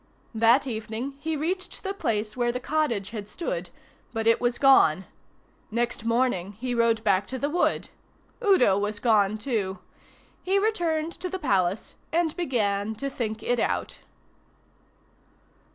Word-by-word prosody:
That 230 Hz, +5 st, +4 dB
evening 225 Hz, +2 st, -4 dB
he 320 Hz, +1 st, -2 dB
reached 365 Hz, +5 st, -3 dB
the 390 Hz, 0 st, -2 dB
place 215 Hz, -, -2 dB
where 240 Hz, -1 st, +1 dB
the 250 Hz, -, -3 dB
cottage 250 Hz, -9 st, -1 dB
had 210 Hz, -3 st, -6 dB
stood, 360 Hz, -, -4 dB, 0.4 s
but 225 Hz, -1 st, -2 dB
it 230 Hz, 0 st, +4 dB
was 240 Hz, 0 st, +1 dB
gone. 190 Hz, -, +5 dB, 0.6 s
Next 235 Hz, 0 st, -2 dB
morning 230 Hz, -5 st, +1 dB
he 245 Hz, +4 st, -4 dB
rode 230 Hz, -2 st, +2 dB
back 195 Hz, -2 st, +2 dB
to 260 Hz, -, -4 dB
the 285 Hz, +3 st, -2 dB
wood. 350 Hz, +2 st, +1 dB, 0.5 s
Udo 250 Hz, -, +4 dB
was 205 Hz, +1 st, -2 dB
gone 215 Hz, -3 st, +3 dB
too. 210 Hz, -5 st, -2 dB, 0.6 s
He 380 Hz, +2 st, +1 dB
returned 340 Hz, -6 st, 0 dB
to 365 Hz, -, -3 dB
the 380 Hz, -, -3 dB
Palace, 195 Hz, -, 0 dB
and 330 Hz, -1 st, +1 dB
began 220 Hz, -, 0 dB
to 275 Hz, +5 st, -4 dB
think 220 Hz, -4 st, -4 dB
it 245 Hz, 0 st, +1 dB
out. -, -, -1 dB
240 Hz, 145 wpm, -26 LUFS, 215-305 Hz, 0.6 s, gone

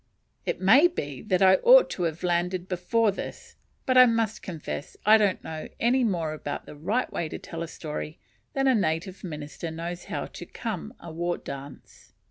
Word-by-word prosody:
It -, -, -1 dB
may 260 Hz, -, +7 dB
be 145 Hz, -, -5 dB
that 195 Hz, -3 st, +1 dB
I 190 Hz, 0 st, +7 dB
ought -, -, +6 dB
to 180 Hz, -, -3 dB
have 160 Hz, +3 st, -11 dB
landed 180 Hz, +1 st, 0 dB
before 200 Hz, +5 st, +1 dB
this; 195 Hz, -, -8 dB, 0.3 s
but 255 Hz, -1 st, +5 dB
I 255 Hz, -, +9 dB
must 225 Hz, -2 st, 0 dB
confess 160 Hz, -5 st, -6 dB
I 215 Hz, +1 st, +7 dB
don't 200 Hz, -3 st, +1 dB
know 155 Hz, -1 st, -6 dB
any 250 Hz, +3 st, +3 dB
more 170 Hz, -8 st, 0 dB
about 145 Hz, -2 st, -5 dB
the -, -, -10 dB
right 200 Hz, +12 st, -1 dB
way 165 Hz, -, -2 dB
to -, -, -5 dB
tell 165 Hz, -1 st, -7 dB
a 170 Hz, -, -3 dB
story, 155 Hz, -1 st, -6 dB, 0.4 s
than 270 Hz, 0 st, +1 dB
a 265 Hz, -, +5 dB
native 185 Hz, -2 st, -1 dB
minister 155 Hz, -1 st, -6 dB
knows 170 Hz, +2 st, -5 dB
how -, -, -3 dB
to -, -, -9 dB
"come" 70 Hz, -, -5 dB
a 170 Hz, -, -9 dB
war 175 Hz, +2 st, -2 dB
dance. 140 Hz, +1 st, -10 dB
180 Hz, 190 wpm, -27 LUFS, 160-220 Hz, 0.4 s, I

